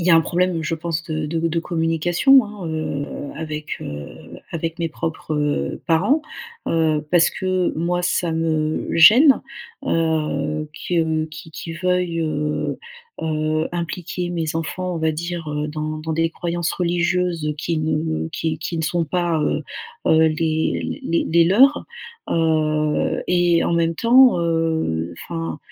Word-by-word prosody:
Il 170 - -2
y - - +5
a - - +8
un 165 - +7
problème, 175 0 0
je 155 +2 -1
pense, 165 0 -3
de 155 -2 -3
de 165 +1 -1
de 165 +1 -1
communication, 170 - +3
hein, 205 -4 -8
heu, 155 -3 -3 0.3
avec, 155 -1 -5
heu, 75 0 -8
avec 165 +1 -3
mes 165 - -1
propres, 160 -1 -4
heu, 145 - -1
parents. 200 - +3 0.5
Heu, 155 -2 +1
parce 170 -1 +4
que 185 -1 0
moi 175 +2 0
ça 175 -1 0
me 160 -1 0
gêne, 245 - +7 0.4
heu, 155 - 0 0.2
que 160 -2 +1
qu'ils 160 +1 -11
qu'ils 165 +1 -7
veuillent, 180 -2 +1
heu, 150 -1 -2 0.4
heu, 155 0 0
impliquer 175 +1 -4
mes 165 -2 -2
enfants, 180 +3 -3
on 165 - -3
va 160 0 +1
dire, 170 0 -4
heu, 150 0 -2
dans 155 0 -4
dans 160 +1 -4
des 165 0 +1
croyances 170 0 -2
religieuses 175 -2 0
qui 165 0 -1
ne 155 +1 -1
qui 160 -1 -3
qui 165 +1 -4
ne - - -1
sont 170 +1 0
pas, 170 +1 0
heu, - - -1 0.4
heu, 160 - +5
les 160 0 -1
les 170 - +1
les 170 +1 +5
leurs. 260 - +5 0.5
Heu, 155 -2 +1
et 175 -1 +3
en - - 0
même 165 0 +1
temps, 250 -1 +6
heu, 160 - 0
enfin 165 -2 -5
165 Hz, 155 wpm, -21 LUFS, 155-175 Hz, 0.5 s, a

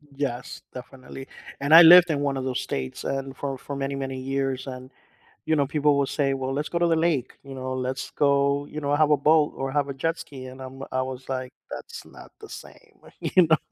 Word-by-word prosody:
Yes, 125 -3 -4
definitely, 130 +1 -10 0.3
and 140 +3 +2
I 165 - +12
lived 175 +1 +9
in 145 - 0
one 140 -1 -1
of 130 - -3
those 130 -1 -2
states 65 -1 -5
and 135 0 -4
for 135 -2 -4
for 140 - -7
many 140 0 -3
many 135 -1 -4
years, 135 0 -2
and, 130 0 -8 0.5
you 160 - +2
know, 140 -2 +1
people 145 0 +2
will 140 -1 +1
say, 140 -2 0
"Well, 135 0 -3
let's 145 +2 -3
go 170 - -1
to 175 - +3
the 165 - +3
lake," 160 -6 0
you 135 -1 -10
know, 130 0 -5
"Let's 130 0 -3
go," 140 0 +2
you 155 - -7
know, 145 0 0
"have 155 0 +3
a 150 - +5
boat 150 +1 +3
or 135 0 -3
have 145 0 0
a 140 - -3
jet 165 +5 -2
ski," 130 -2 -9
and 130 +1 -10
I'm 130 +1 -9
I 130 0 0
was, 130 0 -6
like, 130 -1 -4 0.2
"That's - - -8
not - - -14
the - - -12
same," - - -13 0.2
you 180 -3 +3
know. 160 -1 +5
135 Hz, 230 wpm, -25 LUFS, 130-145 Hz, 0.5 s, I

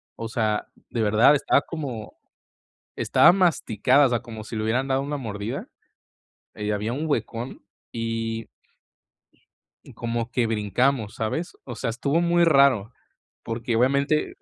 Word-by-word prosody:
O 115 -1 -6
sea, 110 -3 -1 0.2
de 115 - -2
verdad, 110 +7 +5
estaba 140 - +2
como 135 -11 -6 0.8
estaba - - +5
masticada, 145 - +3
o - - +2
sea, 120 -1 0
como 110 -3 -9
si 115 - -7
le 110 - -2
hubieran 125 +5 0
dado 135 0 +1
una 145 +1 -3
mordida, 105 -3 -5 0.9
eh, 105 - -6
y 105 - 0
había 105 +3 -2
un 150 +5 -3
huecón 125 -4 -3 0.3
y 115 -1 -3 1.4
y - - -14
como 115 0 -3
que 120 -1 +1
brincamos, 110 +2 0
¿sabes? 115 +10 -3
O 120 - -7
sea, 115 - -2
estuvo 140 +7 0
muy 175 0 +3
raro, 135 -8 +4 0.5
porque 115 0 -3
obviamente 140 +5 +1
120 Hz, 145 wpm, -24 LUFS, 110-140 Hz, 1.4 s, verdad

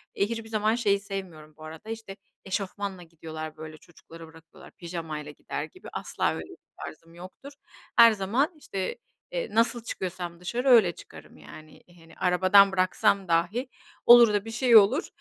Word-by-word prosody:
Eee, 200 - +1
hiçbir 225 -1 -5
zaman 215 0 +1
şeyi 200 -4 +1
sevmiyorum 185 -6 -8
bu 155 - -13
arada, 160 +7 -10
işte, 225 -3 -7 0.3
eşofmanla 195 -1 -4
gidiyorlar, 155 -1 -9
böyle, 155 0 -9
çocukları 165 0 -15
bırakıyorlar 160 0 -17
pijamayla 165 -4 -7
gider 150 - -6
gibi. - - -15
Asla - - -2
öyle - - -6
bir - - -13 0.3
tarzım 165 +2 -12
yoktur. 185 +11 -12 0.4
Her 230 -1 +8
zaman, 220 - 0
işte, 195 -10 -5 0.3
eee, - - -3
nasıl 230 +1 +1
çıkıyorsam 180 -5 -6
dışarı 235 +9 -3
öyle 225 -8 +6
çıkarım - - -14
yani. 155 0 -14 0.2
Hani, 165 0 -18
arabadan 185 +2 +4
bıraksam 185 +1 +1
dahi, 175 +10 0 0.4
olur 235 -2 +8
da 205 0 -1
bir 225 - -7
şey 235 +1 +3
olur, 220 - +4
190 Hz, 160 wpm, -26 LUFS, 165-225 Hz, 0.4 s, Her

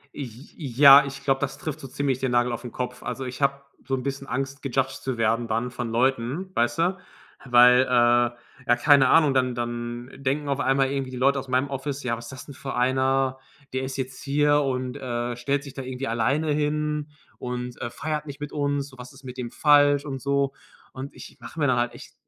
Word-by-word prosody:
J 140 -4 -5 0.5
ja, 140 -1 +10
ich 140 0 -7
glaube, 135 -1 +1
das 135 -1 -2
trifft 155 -6 -5
so 135 - -8
ziemlich 135 0 -1
den 130 -1 -1
Nagel 120 0 +2
auf 120 - -4
den 120 - -8
Kopf. 125 0 -5
Also, 135 - -4
ich 130 +2 -7
habe 140 0 +1 0.2
so 135 - -1
'n 130 - -4
bisschen 135 0 -4
Angst, 135 +1 -3
gejudged 130 -1 -1
zu 130 -3 -3
werden 115 +1 +1
dann 115 +2 -1
von 120 -2 -4
Leuten, 130 +9 0
weißt 120 +6 +1
du? 180 +3 +2 0.5
Weil, 125 0 +7
äh, - - +2
ja, 120 +1 +2
keine 135 0 +5
Ahnung, 155 -4 +5
dann 125 -2 +1
dann 120 +1 -4
denken 140 +2 -2
auf 140 0 0
einmal 135 0 +2
irgendwie 135 -2 -2
die 125 - -6
Leute 135 +2 +3
aus 135 - -8
meinem 130 +2 +1
Office: 140 +1 -4
„Ja, 120 -2 0
was 120 +1 -9
ist 120 - -9
das 130 - -9
denn 140 - -10
für 135 - -6
einer? 130 +1 +1 0.3
Der 130 - -1
ist 130 0 -4
jetzt 130 -1 -5
hier 145 +1 +3
und, 130 -2 -2
äh, 120 -2 -3
stellt 140 +4 -1
sich 140 -2 -10
da 135 - -6
irgendwie 130 +1 -5
alleine 135 +7 +1
hin 150 0 -1 0.3
und, 125 0 -5
äh, 120 - -3
feiert 150 +4 -4
nicht 140 -1 -8
mit 145 0 -6
uns. 145 -1 -1
So, 130 -2 -17
was 125 +2 -10
ist 135 +1 -16
mit 130 -1 -9
dem 120 -1 -4
falsch?“ 145 +1 +4
Und 135 -2 -5
so. 140 -1 0 0.4
Und 135 +2 -8
ich - - -12
mache 160 - -9
mir 150 - +2
da 130 - +3
halt 120 0 0
echt - - -12
135 Hz, 225 wpm, -25 LUFS, 125-140 Hz, 0.5 s, ja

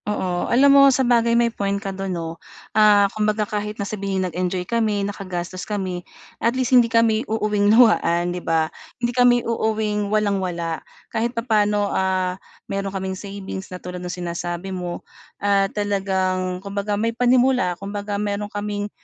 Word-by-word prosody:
Oo, 185 -4 -1
alam 275 +3 +5
mo 275 0 +8
sabagay 240 -3 +3
may 235 -1 +2
point 200 -2 -1
ka 200 -1 -5
do'n, 195 0 -4
'no? 165 -2 -5 0.3
Ah, 210 -1 +6
kumbaga, 215 0 0
kahit 210 0 -4
na 200 - -3
sabihin, 195 -2 -2
nag-enjoy 180 +1 -2
kami, 215 -2 0
nakagastos 185 -3 -5
kami, 190 -4 -3 0.4
at 235 +3 +1
least 255 0 0
hindi 240 -2 +6
kami 230 -2 +3
uuuwing 210 -2 +1
luhaan, 175 -7 +4
'di 180 - -5
ba? 160 -1 0 0.2
Hindi 240 0 -1
kami 245 0 +5
uuwing 215 -2 -1
walang-wala. 185 -6 -1 0.3
Kahit 235 +2 -1
papano, 210 -3 +1
ah, 185 -1 0 0.3
mayroon 195 0 -3
kaming 190 -1 -4
savings 195 -1 -7
na 180 - -6
tulad 180 0 -7
no'ng 180 - -5 0.2
sinasabi 175 +2 -4
mo. 180 -1 -5 0.3
Ah, 200 -1 +2
talagang 190 -2 -1
kumbaga 200 +1 -2
may 230 +2 0
panimula, 245 -6 +2
kumbaga 205 +1 -4
mayroon 205 0 -2
kaming, 205 0 -3
205 Hz, 155 wpm, -22 LUFS, 185-220 Hz, 0.4 s, mo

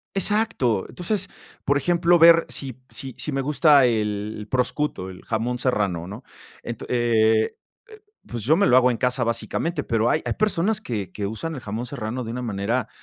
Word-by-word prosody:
Exacto. 195 - +1
Entonces, 185 +2 -3 0.4
por 140 - +2
ejemplo, 170 +4 +3
ver 165 0 +7
si 135 -4 -5
si 135 -2 -8
si 150 - -3
me 135 - 0
gusta 145 0 +4
el 105 -2 -2
prosciutto, 125 -6 -1
el 90 - -12
jamón 120 +2 -2
serrano, 100 -9 -1
¿no? 105 +7 -9 0.4
Ento 115 -2 -6
eh, 110 -2 +2 0.3
eh, 435 -1 -14 0.3
pues, 120 -2 -6
yo 155 +7 +4
me 200 - +3
lo 125 - +5
hago 125 0 +5
en 120 - -1
casa, 125 +1 0
básicamente, 160 +8 -2
pero 115 +1 +1
hay 155 - +1
hay - - -1
personas 215 0 0
que 105 - -4
que 100 - -3
usan 135 +11 -4
el 135 - -6
jamón 110 +2 -5
serrano 120 -1 -4
de 110 - -6
una 125 +2 -4
manera 110 +2 -1
125 Hz, 185 wpm, -23 LUFS, 110-155 Hz, 0.4 s, ver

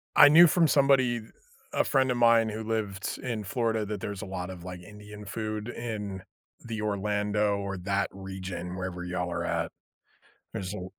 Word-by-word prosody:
I 145 - +10
knew 170 +4 +9
from 165 +1 +4
somebody, 135 -4 +4 0.5
a - - +3
friend 130 -3 +2
of 125 - 0
mine 115 -1 +5
who 110 +1 -4
lived 105 -3 -2
in 115 -4 -3
Florida 110 +1 0
that 105 -2 -4
there's 100 -2 -4
a - - -5
lot 95 -2 -5
of, 90 -2 -8
like, 90 0 -7
Indian 105 +2 -11
food 110 +1 -4
in 105 -6 -5 0.4
the 115 -2 -4
Orlando, 105 0 0
or 100 -1 -4
that 100 +2 0
region, 95 -2 -6
wherever 90 -1 -4
y'all 90 0 -2
are - - -2
at. - - -1 0.8
There's 95 0 -4
a 90 -3 -5
105 Hz, 175 wpm, -28 LUFS, 95-115 Hz, 0.8 s, I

